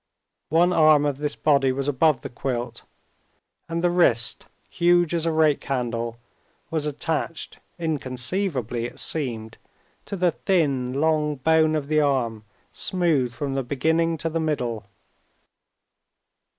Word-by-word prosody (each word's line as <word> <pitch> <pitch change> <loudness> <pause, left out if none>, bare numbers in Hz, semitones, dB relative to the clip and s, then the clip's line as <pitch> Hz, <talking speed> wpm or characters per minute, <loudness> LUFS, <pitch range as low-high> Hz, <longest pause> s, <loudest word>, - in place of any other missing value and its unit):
One 175 +3 +3
arm 155 -3 +5
of 145 -2 -1
this 150 0 -2
body 140 -3 +3
was 135 +1 -3
above 145 -1 +2
the - - -6
quilt, 120 -1 -4 0.8
and 165 +1 -2
the 175 - +3
wrist, 120 -10 +2 0.2
huge 175 -1 +2
as 165 -1 0
a - - +2
rake 155 -2 +2
handle, 120 -3 -2 0.5
was 155 -2 -1
attached, 160 +2 -3 0.2
inconceivably 130 - -2
it - - -7
seemed, 115 -8 -3 0.5
to - - -4
the 180 -2 +2
thin, 140 -9 0
long 155 -1 +1
bone 155 +3 +3
of 145 -2 -2
the 155 0 +2
arm 120 -7 0 0.3
smooth 160 -9 0
from 140 +1 -3
the 135 - 0
beginning 160 +6 0
to 165 - -2
the 165 - -1
middle. 120 -9 -2
150 Hz, 135 wpm, -24 LUFS, 130-165 Hz, 0.8 s, arm